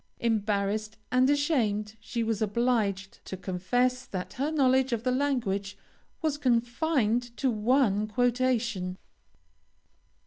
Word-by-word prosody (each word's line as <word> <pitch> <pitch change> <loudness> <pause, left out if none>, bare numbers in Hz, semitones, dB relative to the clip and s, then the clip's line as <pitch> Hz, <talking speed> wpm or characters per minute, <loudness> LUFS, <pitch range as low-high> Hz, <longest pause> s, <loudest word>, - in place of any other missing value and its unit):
Embarrassed 215 -1 0
and 255 +1 +4
ashamed, 225 -8 +1
she 230 +1 -3
was 225 -2 -1
obliged 210 -3 0
to 190 - -6
confess 245 +8 0
that 185 -2 -6
her 280 +3 -1
knowledge 265 -4 +3
of 230 -1 -2
the 255 - +1
language 240 -8 -1 0.5
was 300 -2 0
confined 245 -1 +1
to 265 -2 +1
one 215 -2 +2
quotation. 235 -5 0
235 Hz, 110 wpm, -28 LUFS, 210-255 Hz, 0.5 s, and